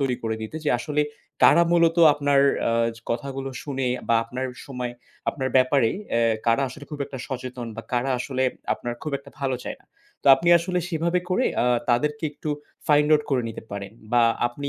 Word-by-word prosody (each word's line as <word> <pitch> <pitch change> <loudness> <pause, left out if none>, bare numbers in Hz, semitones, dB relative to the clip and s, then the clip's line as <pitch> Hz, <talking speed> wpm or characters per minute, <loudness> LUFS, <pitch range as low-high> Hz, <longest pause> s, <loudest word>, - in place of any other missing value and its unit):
তৈরি 130 -3 0
করে 110 -1 -1
নিতে 110 +8 -6
যে - - +3
আসলে 150 +3 -1 0.4
কারা 170 +2 +7
মূলত 170 0 +4 0.2
আপনার 145 -1 +2 0.3
আ - - +2 0.3
জ - - -12
কথাগুলো 135 +3 -3
শুনে 135 -3 -3 0.2
বা 115 - +4
আপনার 130 +3 -4 0.2
সময়ে 125 -3 -4 0.4
আপনার 130 -1 -1
ব্যাপারে 130 -2 +4 0.2
অ্যা 115 - +2 0.3
কারা 115 +4 +3
আসলে 145 +3 -10
খুব 150 - -6
একটা 135 -2 -8
সচেতন 125 -2 -5
বা 115 - -5
কারা 125 +2 +1
আসলে 130 0 -2 0.3
আপনার 120 - -5
খুব 150 - -4
একটা 140 0 -15
ভালো 130 -2 0
চায় - - -5
না। - - -26 0.4
তো - - -9
আপনি 170 +6 -1
আসলে 180 +2 -2
সেভাবে 170 +1 0
করে 245 +8 +2 0.2
আ - - +2 0.3
তাদেরকে 150 +5 +1
একটু 150 +1 -5 0.4
find 150 0 +4
out 150 - +2
করে 130 -3 +2
নিতে 115 - -7
পারেন 100 0 -6 0.2
বা 120 -1 +5 0.2
আপনি 140 +4 -5
135 Hz, 190 wpm, -24 LUFS, 125-150 Hz, 0.4 s, কারা